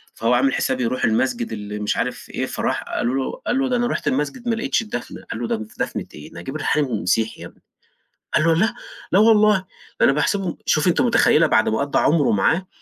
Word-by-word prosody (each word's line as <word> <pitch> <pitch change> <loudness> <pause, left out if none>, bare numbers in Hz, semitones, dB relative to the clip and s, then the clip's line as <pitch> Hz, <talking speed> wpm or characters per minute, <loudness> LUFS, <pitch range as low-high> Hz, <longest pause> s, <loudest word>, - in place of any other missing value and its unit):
فهو 115 +2 +1
عامل 130 +2 +3
حساب 130 -1 -1
يروح 125 +2 -1
المسجد 115 +1 0
اللي 105 -1 -6
مش 105 0 -1
عارف - - -3
إيه، - - -3
فراح - - -2
قالوا 120 +2 -2
له 135 -1 -1 0.2
قال 250 - +1
له 270 -1 0
ده 250 - +1
أنا 240 0 +1
رُحت - - -3
المسجد 150 - -2
ما 230 - +2
لقيتش 230 +3 0
الدفنة، 165 - -7
قالوا 115 +1 -3
له - - +1
د 110 -1 -7
دفنة - - -2
إيه، 75 - -11
نجيب 90 - -7
الريحاني 145 -6 0
مسيحي 110 +6 0
يا - - -7
ابني، - - -21 0.7
قال 155 - +3
له 165 - +4
لأ، 220 +7 +1 0.4
لا 190 - +6
والله 215 -1 +5 0.4
ده - - +7
أنا - - +5
باحسبه 175 +4 -1
شوفي 155 +4 +2
أنتِ 175 - +2
متخيلة 230 -9 +4
بعد 110 - +3
ما 110 - 0
قضّى 140 0 +1
عمره 150 -2 +3
معاه 160 - +1
145 Hz, 220 wpm, -21 LUFS, -, 0.7 s, ده